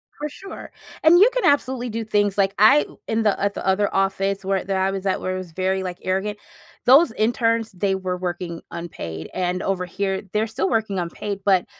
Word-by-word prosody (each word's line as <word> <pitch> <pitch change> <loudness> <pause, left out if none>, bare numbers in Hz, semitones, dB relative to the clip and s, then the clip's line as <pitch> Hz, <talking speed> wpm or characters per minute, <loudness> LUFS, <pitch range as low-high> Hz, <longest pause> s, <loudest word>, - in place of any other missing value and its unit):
For 300 0 -4
sure. 390 +6 -10 0.3
And 340 +3 +7
you 440 +5 +7
can - - 0
absolutely 260 -3 +1
do 225 +1 -3
things, 205 -2 +1
like, 195 0 +2
I 220 +9 +6 0.2
in 225 0 0
the 210 -2 +2
at 200 0 0
the - - -6
other 195 +2 +1
office 195 0 0
where 195 0 0
there 190 0 -1
I 190 - +2
was 195 0 -5
at, 190 - 0
where 185 0 -2
it - - -3
was 180 -3 -7
very, 190 +2 -1
like, 180 -1 -5
arrogant, 195 +3 -2 0.5
those 270 +2 +7
interns, 230 0 +1
they 190 +1 0
were 185 -1 -3
working 175 -2 -4
unpaid, 85 - -6
and 180 0 -1
over 185 -2 -1
here, 195 +1 -2
they're 215 +1 0
still 205 -3 -1
working 215 -4 0
unpaid, 195 +3 -4
but 190 -3 +3
195 Hz, 210 wpm, -22 LUFS, 185-220 Hz, 0.5 s, And